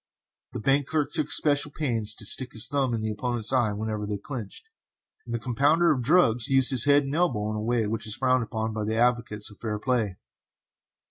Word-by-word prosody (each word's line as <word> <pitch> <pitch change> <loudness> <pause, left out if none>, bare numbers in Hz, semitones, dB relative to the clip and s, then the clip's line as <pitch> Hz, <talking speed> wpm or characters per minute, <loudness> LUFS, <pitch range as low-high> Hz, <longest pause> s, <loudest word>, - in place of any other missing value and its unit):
The - - -4
bank 135 +4 +1
clerk 150 -1 -1
took 155 -2 0
especial 145 -1 +2
pains 115 -8 -1
to 105 - -7
stick 125 +4 +1
his 110 0 +4
thumb 135 -4 -1
in 110 - -4
his 110 - -2
opponent's 120 +2 -2
eye 120 -5 +2
whenever 105 0 -4
they 105 -1 -3
clinched, 120 - -8 0.6
and 120 - -3
the - - 0
compounder 145 +8 +2
of 130 - -3
drugs 120 -5 +3
used 135 0 +3
his 130 -2 +4
head 145 0 +4
and 135 +1 -5
elbow 120 -11 0
in - - -4
a 105 - -3
way 115 0 0
which 110 +1 -3
is 105 - -2
frowned 130 0 +1
upon 110 0 -4
by 110 0 -3
advocates 115 -3 0
of 105 - -17
fair 110 -2 -3
play. 110 -5 -1
120 Hz, 210 wpm, -26 LUFS, 110-135 Hz, 0.6 s, his